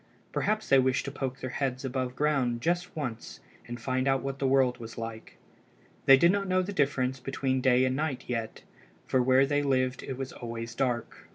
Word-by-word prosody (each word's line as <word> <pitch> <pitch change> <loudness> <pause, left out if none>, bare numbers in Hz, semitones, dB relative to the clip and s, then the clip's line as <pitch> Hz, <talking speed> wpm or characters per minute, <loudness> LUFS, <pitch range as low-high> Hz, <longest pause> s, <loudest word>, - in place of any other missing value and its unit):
Perhaps 215 +1 -1
they 135 - +6
wished 130 0 +1
to 140 - -4
poke 135 -1 -4
their 130 - -4
heads 130 -1 -2
above 130 -1 -2
ground 135 -5 +1
just 175 +6 -1
once 125 -8 -5 0.3
and 120 0 -6
find 130 +2 -1
out 135 -1 +2
what 135 0 -4
the 135 - +1
world 130 -2 +3
was 115 0 -9
like. 115 -1 -7 0.7
They 135 - +9
did 170 +5 +5
not 200 0 -1
know 185 0 +2
the 200 +3 -5
difference 135 -4 0
between 130 0 -1
day 130 0 +4
and 130 0 0
night 145 -3 -2
yet, 115 -2 -4 0.4
for 130 - +2
where 130 +2 +4
they 145 +1 +1
lived 130 -2 0
it 130 - -6
was 135 -1 -5
always 115 -1 -6
dark. 120 -2 -3
130 Hz, 200 wpm, -29 LUFS, 125-140 Hz, 0.7 s, They